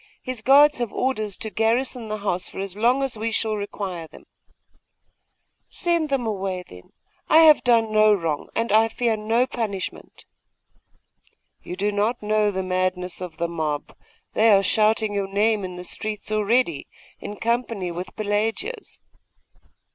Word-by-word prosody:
His 255 Hz, -4 st, -5 dB
guards 285 Hz, +3 st, +6 dB
have 240 Hz, -4 st, -2 dB
orders 215 Hz, -7 st, -2 dB
to 220 Hz, -, -5 dB
garrison 230 Hz, +2 st, 0 dB
the 215 Hz, -, -2 dB
house 190 Hz, -3 st, -2 dB
for -, -, -12 dB
as 195 Hz, -1 st, -4 dB
long 245 Hz, +6 st, +2 dB
as 255 Hz, -5 st, -2 dB
we 225 Hz, +1 st, -1 dB
shall 225 Hz, -1 st, 0 dB
require 195 Hz, -5 st, -5 dB
them.' -, -, -16 dB, 1.4 s
'Send 340 Hz, -4 st, 0 dB
them 270 Hz, -3 st, 0 dB
away, 190 Hz, -4 st, -3 dB
then. 90 Hz, 0 st, -15 dB, 0.4 s
I 320 Hz, -, +7 dB
have 310 Hz, -2 st, +7 dB
done 230 Hz, -3 st, +3 dB
no 215 Hz, 0 st, +5 dB
wrong, 165 Hz, -7 st, -1 dB
and 230 Hz, -1 st, 0 dB
I 220 Hz, +1 st, +5 dB
fear 230 Hz, 0 st, 0 dB
no 225 Hz, +3 st, +1 dB
punishment.' 215 Hz, -7 st, -5 dB, 1.4 s
'You 180 Hz, -, -7 dB
do 205 Hz, +2 st, 0 dB
not 210 Hz, +3 st, -1 dB
know 210 Hz, 0 st, +2 dB
the 190 Hz, -1 st, -2 dB
madness 185 Hz, 0 st, -2 dB
of 180 Hz, -3 st, -7 dB
the 170 Hz, -, -1 dB
mob; 155 Hz, -3 st, -3 dB, 0.4 s
they 225 Hz, +1 st, +4 dB
are 195 Hz, -1 st, +5 dB
shouting 215 Hz, +1 st, +2 dB
your 200 Hz, -1 st, -1 dB
name 205 Hz, +1 st, +1 dB
in 180 Hz, -1 st, -6 dB
the 180 Hz, -, -7 dB
streets 215 Hz, +3 st, -4 dB
already, 215 Hz, -, +1 dB, 0.3 s
in 205 Hz, -, -7 dB
company 230 Hz, -5 st, -2 dB
with 175 Hz, +2 st, -7 dB
Pelagia's. 225 Hz, -, -3 dB
215 Hz, 155 wpm, -23 LUFS, 190-230 Hz, 1.4 s, I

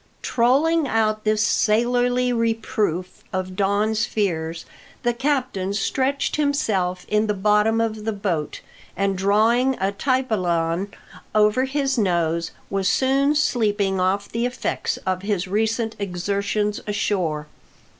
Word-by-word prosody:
Trolling 280 Hz, +6 st, +2 dB
out 215 Hz, -2 st, 0 dB
this 215 Hz, 0 st, +2 dB
sailorly 245 Hz, +3 st, +2 dB
reproof 220 Hz, -6 st, -1 dB
of 185 Hz, -1 st, -3 dB
Don's 205 Hz, +3 st, +1 dB
fears, 165 Hz, -5 st, -2 dB, 0.4 s
the 240 Hz, -1 st, +2 dB
captain 250 Hz, -7 st, -1 dB
stretched 270 Hz, +8 st, 0 dB
himself 205 Hz, -12 st, 0 dB
in 215 Hz, +1 st, +1 dB
the 210 Hz, -, 0 dB
bottom 210 Hz, +3 st, +2 dB
of 220 Hz, -2 st, -1 dB
the 220 Hz, -, -1 dB
boat, 185 Hz, -8 st, -3 dB, 0.4 s
and 195 Hz, +1 st, +1 dB
drawing 225 Hz, +7 st, +2 dB
a 195 Hz, +1 st, +1 dB
tai 255 Hz, +6 st, 0 dB
paulin 180 Hz, -4 st, -1 dB, 0.4 s
over 215 Hz, +5 st, +4 dB
his 270 Hz, -1 st, 0 dB
nose, 170 Hz, -4 st, +1 dB, 0.2 s
was 195 Hz, -2 st, +1 dB
soon 275 Hz, +6 st, +2 dB
sleeping 205 Hz, -9 st, +1 dB
off 195 Hz, +2 st, +1 dB
the 235 Hz, +2 st, -1 dB
effects 250 Hz, -, -2 dB
of 185 Hz, -1 st, -1 dB
his 200 Hz, -2 st, -1 dB
recent 220 Hz, +3 st, 0 dB
exertions 200 Hz, +2 st, -1 dB
ashore. 185 Hz, -7 st, -1 dB
210 Hz, 125 wpm, -22 LUFS, 190-240 Hz, 0.4 s, over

